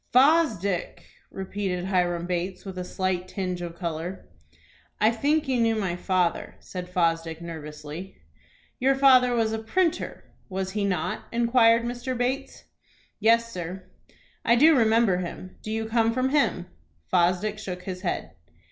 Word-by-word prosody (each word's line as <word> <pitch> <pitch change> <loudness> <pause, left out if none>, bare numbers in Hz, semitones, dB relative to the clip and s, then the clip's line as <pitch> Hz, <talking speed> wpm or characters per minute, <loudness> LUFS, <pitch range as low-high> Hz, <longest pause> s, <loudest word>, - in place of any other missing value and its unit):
"Fosdick!" 250 - +3 0.3
repeated 190 -2 -3
Hiram 175 -2 0
Bates, 180 +2 -3
with 190 -1 -6
a - - -3
slight 185 0 -2
tinge 185 -2 -3
of 170 -1 -6
color. 170 - -5 0.7
"I 215 +2 +4
think 290 +6 +1
you 255 -3 +1
knew 225 -1 +3
my 190 -5 -1
father," 180 -1 0
said 180 -1 -7
Fosdick, 165 -2 0
nervously. 160 +2 -8 0.6
"Your 270 +2 +3
father 255 -2 +5
was 225 -1 +1
a 220 - -2
printer, 330 +10 -1 0.3
was 190 0 -3
he 205 0 -1
not?" 195 -2 -2
inquired 230 -1 +4
Mr. 245 +1 -3
Bates. 260 +3 -2 0.6
"Yes, 230 +2 +3
sir." 180 +2 -5 0.6
"I 235 - +4
do 310 +6 +6
remember 225 -5 +4
him. 185 +1 -7
Do - - -7
you 220 0 -2
come 225 0 +2
from 255 +2 +1
him?" 275 -11 +1 0.5
Fosdick 185 +4 +2
shook 180 -3 -6
his 185 -1 -6
head. - - -3
195 Hz, 145 wpm, -26 LUFS, 180-235 Hz, 0.7 s, do